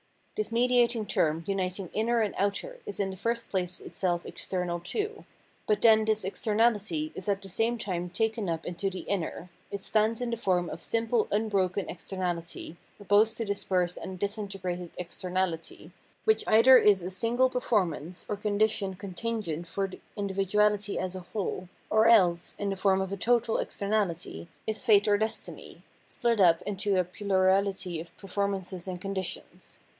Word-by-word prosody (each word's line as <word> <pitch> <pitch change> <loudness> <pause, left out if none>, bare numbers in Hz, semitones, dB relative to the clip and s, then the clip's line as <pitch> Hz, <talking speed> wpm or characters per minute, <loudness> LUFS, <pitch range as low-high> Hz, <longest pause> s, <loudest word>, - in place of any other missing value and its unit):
This 430 - -2
mediating 240 -1 +3
term 160 -4 +1
uniting 190 -1 -2
inner 230 +2 +2
and 210 -3 0
outer 350 - -2
is 415 - -5
in 195 -1 0
the - - -7
first 230 +4 -2
place 180 -2 -2
itseK 175 -2 -2
external 180 -2 -3
too. 420 - -4 0.4
But 210 - +2
then 220 -1 +6
this 215 -2 +1
exter 210 +2 -1
nahty 205 -9 +2
is 190 - -4
at 200 0 0
the 195 - -3
same 225 +5 +1
time 180 -5 -3
taken 220 +1 -1
up 165 -1 -3
into 180 +3 -2
the 185 -1 -6
inner; 180 -2 -3 0.2
it 200 - -4
stands 220 +2 +1
in 245 -1 -2
the 235 - -1
form 180 -5 +1
of 165 - -7
simple 225 +2 +1
unbroken 200 -3 0
externaUty 175 -2 -4 0.2
op 205 - -13
posed 215 +2 +4
to 230 - -2
dispersed 185 -3 0
and 185 -1 -6
disintegrated 195 -3 -3
externality, 180 -1 -3 0.3
which 440 0 +3
either 230 +4 +8
is 200 -6 +4
a 180 - -4
single 240 +6 +2
performance 185 - -1
or 210 - -1
condition 205 -1 0
contingent 195 -3 -4
for 195 +3 -1
the 190 - -11 0.2
individuality 205 +1 +1
as 185 0 -2
a 185 - -5
whole, 185 -3 -3 0.2
or 220 +1 +5
else, 180 -7 +4
in 200 -1 -2
the - - -1
form 190 0 +2
of 190 0 -3
a 200 - -3
total 235 +1 +2
externality, 185 - -2 0.2
is 220 +2 -2
fate 210 -4 +5
or 205 -1 +4
destiny, 220 +1 -4 0.2
split 235 -4 0
up 170 -3 +5
into 200 0 -1
a 185 - +4
plurality 190 -1 +1
of 170 - -10
performances 195 -2 -3
and 180 -1 -4
conditions. 190 -1 -5
200 Hz, 165 wpm, -29 LUFS, 180-220 Hz, 0.4 s, either